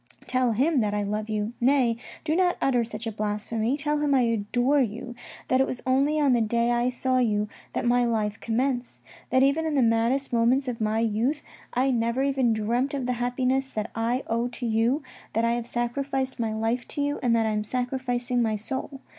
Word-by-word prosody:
Tell 255 -2 +1
him 275 +6 +2
that 210 -2 0
I 205 - 0
love 210 +2 -3
you, 215 +1 -2
nay, 250 -2 +3 0.3
do 315 0 0
not 360 0 +2
utter 250 -3 +2
such 225 0 -7
a 225 - -2
blasphemy, 215 +4 -1
tell 295 0 0
him 290 -2 +2
I 260 - +4
adore 245 +4 +1
you, 235 +1 -3 0.3
that 255 +1 +3
it 265 - +2
was 250 - -5
only 275 +4 +2
on 285 -3 +4
the 240 - +3
day 235 +2 +1
I 240 +1 +2
saw 255 +1 0
you 210 -4 +1 0.3
that - - -2
my 245 +1 +3
life 215 -3 -1
commenced; 245 +2 -2 0.3
that 260 +1 +4
even 280 +4 +3
in 310 - -1
the 270 - +4
maddest 235 +4 +1
moments 245 +4 +3
of 240 -2 -4
my 215 0 +1
youth 230 +7 0 0.3
I 260 +2 +2
never 235 +2 0
even 270 -3 +2
dreamt 235 +6 0
of 265 -3 -2
the 250 - 0
happiness 255 +2 0
that 215 0 -3
I 235 +4 -1
owe 230 +2 0
to 245 0 -6
you, 230 +6 +1 0.3
that 225 +1 +1
I 230 - +2
have 235 0 -2
sacrificed 260 +2 -2
my 225 -2 0
life 225 +3 -1
to 290 - -4
you 285 0 -1
and 240 -3 +2
that 225 -1 +2
I 220 - +1
am 210 0 -1
sacrificing 245 +1 -1
my 220 -2 +1
soul. 265 +5 -5
245 Hz, 215 wpm, -26 LUFS, 225-265 Hz, 0.3 s, I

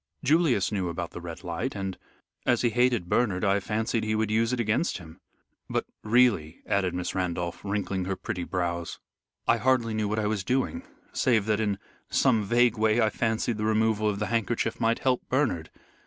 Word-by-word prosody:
Julius 145 - +3
knew 95 -4 -1
about 85 0 -4
the 90 - -8
Red 85 +1 -8
Light, 90 +9 -3
and, 95 -1 -3 0.5
as 120 0 +2
he 120 - +3
hated 120 -6 +2
Bernard, 100 -3 +1
I 100 0 +3
fancied 110 +3 -1
he 110 0 0
would 110 -1 0
use 115 +2 +2
it 125 - -1
against 115 +8 +1
him. 85 0 -13 0.5
But - - -1 0.2
really," 110 -9 +2
added 95 -3 0
Miss 90 0 -2
Randolph, 90 -2 -2
wrinkling 100 -2 -2
her 95 +1 -1
pretty 95 -1 -4
brows, 85 -1 -2 0.5
"I 115 - +4
hardly 120 -2 +2
knew 110 -1 0
what 105 +1 -1
I 110 - 0
was 105 -2 -1
doing, 135 - 0 0.3
save 115 -6 +2
that 105 -1 +1
in 105 -3 0 0.3
some 115 -5 +3
vague 120 +1 +3
way 110 +1 +3
I 110 -2 +3
fancied 115 0 0
the 105 - -1
removal 110 -1 +2
of 100 - -2
the 105 - -1
handkerchief 115 0 0
might 115 +1 +2
help 130 -2 +1
Bernard. 125 - 0
110 Hz, 190 wpm, -27 LUFS, 95-115 Hz, 0.5 s, I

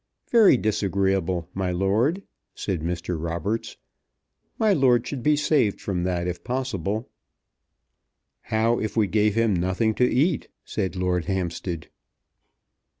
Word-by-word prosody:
"Very 220 - +6
disagreeable, 95 -5 0
my 95 -1 -1
lord," 110 - +1 0.3
said 95 -6 -3
Mr. 85 0 -3
Roberts. 85 +7 -3 0.8
"My 215 -2 +3
lord 125 -7 +3
should 135 0 -4
be 150 +4 +3
saved 145 -8 +2
from 90 -3 -2
that 90 -1 -1
if 90 0 -4
possible." 115 -4 -2 1.4
"How 115 +2 +2
if 110 0 -3
we 110 - +4
gave 105 +1 +1
him 115 -2 +2
nothing 95 +5 +1
to 125 - +4
eat?" 155 +5 +1 0.2
said 95 -3 -3
Lord 90 -2 0
Hampstead. 90 -3 -3
100 Hz, 125 wpm, -24 LUFS, 90-120 Hz, 1.4 s, Very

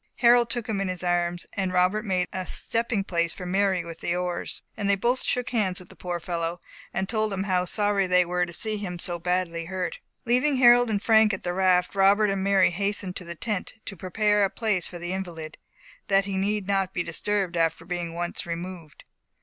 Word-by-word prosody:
Harold 240 -1 +5
took 235 -1 0
him 210 -3 -1
in 195 - -1
his 185 0 -4
arms, 175 0 0
and 190 -2 -1
Robert 185 +4 +2
made 185 -4 0
a 185 -1 -4
stepping 230 -3 -1
place 170 -3 -1
for 180 - -8
Mary 190 -1 +1
with 165 -1 -8
the 175 - -1
oars, 180 -1 -3
and 200 -2 -2
they 200 - +5
both 240 +6 +1
shook 250 -1 -1
hands 200 -7 0
with 180 - -13
the - - -14
poor 175 -1 -4
fellow, 170 0 -3 0.3
and 190 0 -2
told 215 0 0
him 195 -1 -2
how 185 -2 +1
sorry 205 0 +1
they 180 0 +4
were 180 +1 0
to 175 - -4
see 215 +5 -2
him 185 -4 -5
so 175 0 -1
badly 175 -1 -1
hurt. 185 0 -4 0.3
Leaving 255 +5 +2
Harold 245 -1 +6
and 205 -2 -1
Frank 220 -2 +5
at - - -11
the 175 - -2
raft, 180 -1 +2
Robert 200 +2 +4
and 195 -1 -1
Mary 195 -2 +4
hastened 200 0 -2
to - - -3
the 170 0 -7
tent 205 +1 -3
to 200 - -6
prepare 205 +3 +1
a 195 - +3
place 210 -6 -1
for 175 - -8
the 175 +1 -4
invalid, 165 -5 -6 0.5
that 195 0 +3
he 195 -1 -3
need 200 +1 0
not 195 -1 0
be 175 - 0
disturbed 190 +1 -1
after 165 -1 0
being 175 -2 -4
once 175 0 -3
removed. 170 -2 -7
190 Hz, 215 wpm, -26 LUFS, 175-205 Hz, 0.5 s, Harold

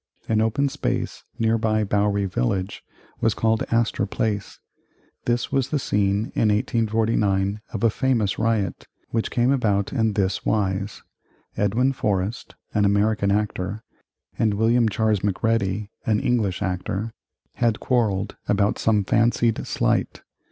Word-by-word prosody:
An 110 -1 +2
open 115 +6 +1
space 130 -3 -3
nearby 110 -2 +1
Bowery 100 0 +1
Village 95 +3 -2 0.4
was 110 -1 +1
called 110 0 +1
Astor 115 -3 +1
Place. 105 0 -2 0.7
This 120 0 0
was 135 -2 +1
the 150 - 0
scene 100 -4 0
in 110 - +2
1849 105 -2 +1
of 110 - -4
a 115 - +4
famous 115 -6 0
riot, 110 -3 -1 0.2
which 115 -1 0
came 120 +2 +2
about 105 -7 +1
in 110 -5 +1
this 100 -2 0
wise: 100 -1 -1 0.5
Edwin 115 +7 +1
Forrest, 105 -2 -2 0.2
an 105 - +2
American 100 0 +2
actor, 105 0 -2 0.6
and 110 -2 +2
William 115 +2 +3
Charles 110 -1 +1
Macready, 105 0 0 0.2
an 110 -2 +3
English 105 -6 0
actor, 95 +4 -3 0.4
had 115 -3 +1
quarrelled 105 -5 0
about 100 0 +1
some 105 -2 +2
fancied 115 +2 +1
slight. - - 0
110 Hz, 130 wpm, -23 LUFS, 100-115 Hz, 0.7 s, a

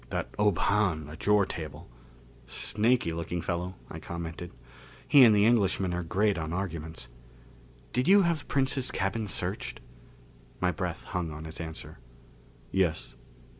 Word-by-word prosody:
That - - -3
Ob 105 -4 +3
Hahn, 90 -8 +1
at 80 +5 -8
your 105 -1 +5
table 80 -5 -7 0.4
" - - -25 0.2
"Snaky 110 - +1
looking 85 +1 -3
fellow," 90 +2 -3
I - - -8
commented. 85 0 -6 0.6
"He 140 -2 +8
and 110 -3 +7
the 100 0 +5
Englishman 100 -5 +2
are 90 - -1
great 95 +3 +1
on 80 -1 -4
arguments. 80 -7 -4 0.8
Did 125 +2 +1
you 200 +1 +7
have 170 -4 0
Princes' 135 -1 +1
cabin 105 +3 -1
searched?" - - -2 0.8
My 90 0 +2
breath 90 -2 -4
hung 90 -2 -3
on 75 +1 -8
his 80 +1 -6
answer. 80 0 -7 0.7
"Yes. 95 -5 0
90 Hz, 145 wpm, -29 LUFS, 85-105 Hz, 0.8 s, He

